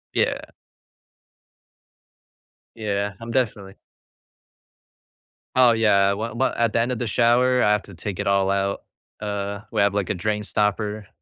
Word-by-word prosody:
Yeah. - - +1 2.4
Yeah, 105 -2 -2
I'm 115 0 -6
definitely 105 -6 -2 1.8
Oh, 125 -2 +7
yeah, 105 -4 +3
well 110 +3 -4
well, 130 +3 +1
at 115 -2 +1
the 115 - +3
end 120 - 0
of 125 - -3
the 120 - -2
shower, 125 +3 +3
I 105 - +4
have 105 -1 +1
to 100 - -13
take 95 +2 -6
it - - -2
all 100 -1 +2
out, 100 0 -1 0.4
uh, 100 -1 -3
we - - -1
have 100 0 +3
like 100 -1 -1
a - - +1
drain 105 +3 -2
stopper. 105 0 -1
105 Hz, 150 wpm, -23 LUFS, 100-115 Hz, 2.4 s, Oh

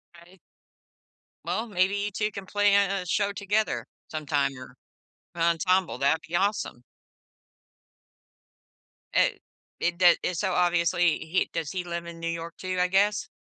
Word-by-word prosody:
Right. 170 +2 -17 1.1
Well, 225 +2 -2
maybe 190 -1 +1
you 205 +1 -2
2 210 +2 -1
can 195 -1 -7
play 205 +1 +2
in 200 -1 +4
a 195 -2 -2
show 200 +3 +1
together 200 - -1 0.2
sometime 145 -3 -1
or 130 0 -11 0.6
an 170 - -6
ensemble, 170 +2 +2
that'd 140 +4 +2
be 175 - -3
awesome. 200 - 0 2.3
It - - +2 0.4
it 175 0 0
doe 175 -1 +7
and 180 - -1
so 190 0 0
obviously 175 -1 +2
he 165 +4 -1
does 165 -3 -3
he 185 -1 -3
live 170 -1 -5
in 170 0 -9
New 165 - -4
York 165 0 -5
too, 185 -1 -4
I 180 - +3
guess? 200 +3 +2
180 Hz, 150 wpm, -27 LUFS, 165-200 Hz, 2.3 s, doe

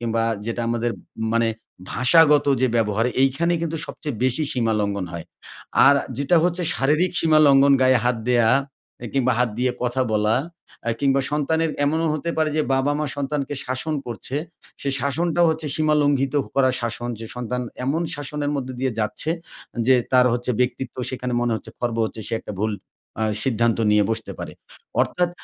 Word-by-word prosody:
কিংবা 115 -1 0 0.2
যেটা 115 +1 -2
আমাদের 120 0 0
ম - - -16 0.3
মানে 115 -1 +3 0.4
ভাষাগত 145 +4 +5 0.2
যে - - +5
ব্যবহার 110 +1 +1 0.2
এইখানেই 165 +6 +2
কিন্তু 165 -1 -2
সবচেয়ে 145 -7 -6
বেশি 130 +4 +1
সীমালঙ্ঘন 105 -5 0
হয়। 85 -1 -6 0.6
আর 140 - +7 0.2
যেটা 155 +5 +3
হচ্ছে 180 0 0
শারীরিক 155 +7 +1
সীমালঙ্ঘন। 140 -3 +5
গায়ে 130 -1 +5
হাত 125 -1 +2
দেয়া, 120 -2 +4 0.5
এ - - -3
কিংবা 130 -2 +2
হাত 125 -1 +2
দিয়ে 125 0 +2
কথা 125 +1 0
বলা, 105 +1 +2 0.5
আ - - +3
কিংবা 135 -1 +3
সন্তানের 160 +2 +1
এমনও 160 +3 +1
হতে 170 +3 -2
পারে 155 -1 +2
যে 155 - +3
বাবা-মা 145 +3 0
সন্তানকে 145 0 -2
শাসন 130 +5 -2
করছে, 120 +3 -4 0.5
সেই 140 -1 -1
শাসনটাও 170 +4 +1
হচ্ছে 155 -1 -3
সীমা 155 -1 +2
লঙ্ঘিত 140 -1 +1 0.2
করা 130 -1 +4
শাসন। 120 +1 -3
যে 115 - -6
সন্তান 125 +1 -3 0.2
এমন 155 +6 0
শাসনের 145 0 -3
মধ্যে 130 -1 -4
দিয়ে 130 -2 0
যাচ্ছে 110 +9 -1 0.6
যে 130 - +6 0.2
তার 125 0 +6
হচ্ছে 120 +1 -2
ব্যক্তিত্ব 125 +1 -2
সেখানে 125 -1 -4
মনে 120 -1 0
হচ্ছে 110 - -10
খর্ব 120 -2 -1
হচ্ছে। 110 0 -5
সে - - -7
একটা - - -8
ভুল 110 0 0 0.5
আ - - +2 0.2
সিদ্ধান্ত 115 -2 +1
নিয়ে 105 -1 +4
বসতে 110 0 -3
পারে। - - -6 0.5
অর্থাৎ 175 -1 0
130 Hz, 165 wpm, -22 LUFS, 120-150 Hz, 0.6 s, আর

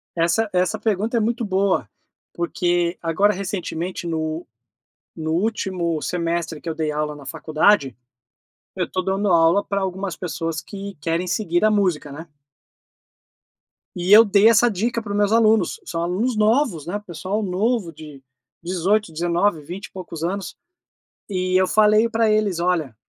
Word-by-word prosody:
Essa 175 +6 +1
essa 180 0 +1
pergunta 220 +2 0
é - - +3
muito 230 +2 -1
boa, 195 -1 0 0.4
porque, 175 0 0
agora 175 +5 +2
recentemente 185 -2 -4
no 160 0 -3 0.7
no 160 -1 -3
último 180 -4 -1
semestre 170 -3 -2
que - - -8
eu 160 - -2
dei 155 -1 -2
aula 150 0 -2
na 145 - -12
faculdade, 155 - +1 0.8
eu 180 -2 -1
tô 185 - -1
dando 195 +2 -1
aula 170 +3 +4
pra 200 - -2
algumas 190 -1 -3
pessoas 165 -2 -3
que 200 -1 -8
querem 165 +3 -1
seguir 175 -2 0
a 215 - +5
música, 180 -8 0
né? 160 +4 -9 1.7
E 180 +2 -2
eu 220 +2 +9
dei 205 +1 +5
essa 230 +1 +5
dica 230 +3 -1
para 215 -2 -7
os - - -1
meus 205 0 +2
alunos. 225 - +3
São 165 - -3
alunos 205 +8 -1
novos 215 - +1
né, 190 +5 -3
pessoal 195 +2 -4
novo 200 -1 -1
de 150 -3 -12 0.4
18, 185 +2 0
19, 170 +1 0
20 175 +7 -8
e - - -14
poucos 175 -4 -8
anos, 190 +2 -3 0.8
e 185 -1 0
eu 185 - +3
falei 215 +2 +4
pra 225 -1 +2
eles: 210 -4 +1
"Olha" 165 -9 0
185 Hz, 155 wpm, -22 LUFS, 165-210 Hz, 1.7 s, eu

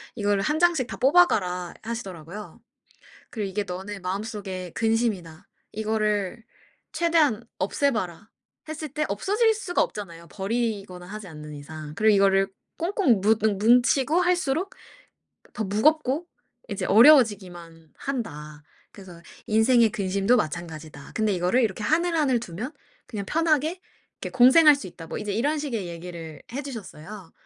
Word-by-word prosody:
"이거를 205 -2 +1
1 300 +1 0
장씩 335 -8 +3
다 - - -7
뽑아가라." 200 - +3
하시더라고요. 200 -4 -7 0.7
그리고 210 -4 -3
"이게 205 +2 -2
너네 195 +2 -6
마음속의 190 -1 -5
근심이다. 220 -8 -1 0.2
이거를 215 0 -1 0.5
최대한 315 -9 +2
없애 280 +9 +1
봐라." 200 -1 -4 0.4
했을 310 0 -5
때 300 +3 -2
없어질 415 - +2
수가 380 -4 -1
없잖아요, 170 -5 -5
버리거나 195 -4 -3
하지 210 -1 -8
않는 150 -2 -9
이상. 150 +1 -9
그리고 220 -1 +4
이거를 195 0 +4 0.3
"꽁꽁 335 - +2
무눙 215 0 +2
뭉치고 250 - +4
할수록 360 0 0 0.8
더 220 - -3
무겁고 290 - +1 0.4
이제 - - -3
어려워지기만 190 - +4
한다. 150 - -5 0.3
그래서 180 -4 -12 0.3
인생의 225 +1 +4
근심도 200 +2 +1
마찬가지다. 155 -3 -5
근데 215 -2 +1
이거를 180 +8 +2
이렇게 210 -1 -1
하늘하늘 315 -2 +2
두면 230 - -6 0.3
그냥 205 -4 -5
편하게 320 +2 +1 0.4
이렇게 - - -5
공생할 290 +5 +8
수 210 - -8
있다." 165 -2 -11
뭐 - - -5
이제 210 -2 -3
이런 290 +8 0
식의 235 -10 -3
얘기를 170 -2 -8
해주셨어요. 215 - -8
215 Hz, 330 characters per minute, -25 LUFS, 185-265 Hz, 0.8 s, 공생할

